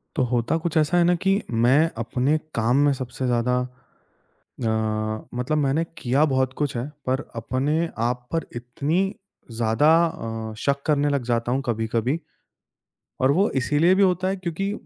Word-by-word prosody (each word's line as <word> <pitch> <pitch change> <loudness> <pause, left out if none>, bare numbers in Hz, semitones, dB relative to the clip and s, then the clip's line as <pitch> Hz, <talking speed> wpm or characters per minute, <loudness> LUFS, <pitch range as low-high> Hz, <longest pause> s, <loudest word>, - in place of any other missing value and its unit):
तो 130 - +2
होता 120 +6 +1
कुछ 165 -1 -2
ऐसा 155 +3 +3
है 175 - +5
ना 175 +1 +3
कि 195 +2 +3
मैं 125 +8 +4
अपने 125 +6 0 0.2
काम 115 +3 +2
में 145 - +3
सबसे 130 -1 -5
ज़्यादा 125 +1 +1 1.1
अ, - - +1 0.7
मतलब 125 +5 -1
मैंने 145 +2 +1
किया 130 +4 +2
बहुत 130 -3 0
कुछ 145 -3 -1
है, 120 +3 -3 0.2
पर 130 +2 +1
अपने 145 +8 -1 0.2
आप 125 0 -4
पर 165 - 0
इतनी 140 +8 -1 0.5
ज़्यादा 115 +6 +2 0.6
अ, - - -8
शक 140 +4 0
करने 145 -1 +2
लग 140 -3 0
जाता 120 0 0
हूँ 130 +2 +1
कभी-कभी 115 +5 -1 1.0
और 130 - +4
वो 195 +7 +3
इसीलिए 150 +8 +3
भी 195 - +3
होता 185 -1 +2
है, 195 - -1
क्योंकि 185 +2 -3
140 Hz, 160 wpm, -24 LUFS, 120-160 Hz, 1.1 s, है